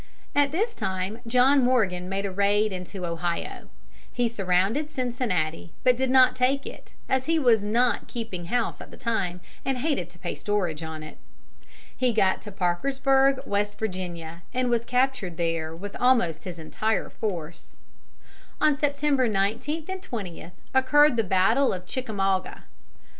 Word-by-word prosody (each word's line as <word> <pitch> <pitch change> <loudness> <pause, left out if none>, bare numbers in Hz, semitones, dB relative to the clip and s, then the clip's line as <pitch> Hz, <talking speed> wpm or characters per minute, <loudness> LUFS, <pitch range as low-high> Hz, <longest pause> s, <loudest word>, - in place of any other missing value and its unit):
At 285 -1 +3
this 435 +9 0
time 190 +4 -3
John 255 +3 +5
Morgan 195 -8 +1
made 195 +1 -2
a 195 - -2
raid 200 +2 +2
into 180 0 -5
Ohio. 170 0 -3 0.4
He 245 -1 +1
surrounded 200 +6 +1
Cincinnati, 235 - -2
but 250 -1 +5
did 260 +1 0
not 260 0 +6
take 265 +2 +1
it, - - -10
as 260 0 +1
he 330 0 +3
was 240 -8 +4
not 235 +4 +1
keeping 225 -8 -5
house 240 +5 -1
at - - -10
the - - -13
time 190 -7 -1 0.2
and 270 -1 -1
hated 250 - -1
to 175 - -16
pay - - -4
storage 180 -7 -1
on 160 -1 -6
it. 155 - -11 0.8
He 250 -2 +1
got 190 -3 +2
to 210 - -9
Parkersburg, 270 +9 +2
West 205 -2 -1
Virginia, 175 -5 -5
and 250 -1 +1
was 235 -1 +1
captured 250 -9 0
there 165 -2 -1
with 200 +4 -7
almost 230 -11 +2
his 180 -2 -6
entire 215 +7 -2
force. 170 -6 -5 0.8
On 305 -2 +4
September 285 -2 +1
19 225 +10 -1
and 375 0 -4
20 200 - -6 0.2
occurred 280 +2 +5
the 225 - +2
battle 210 +8 +3
of 180 -1 -5
Chickamauga. 195 -5 -2
220 Hz, 155 wpm, -26 LUFS, 180-260 Hz, 0.8 s, not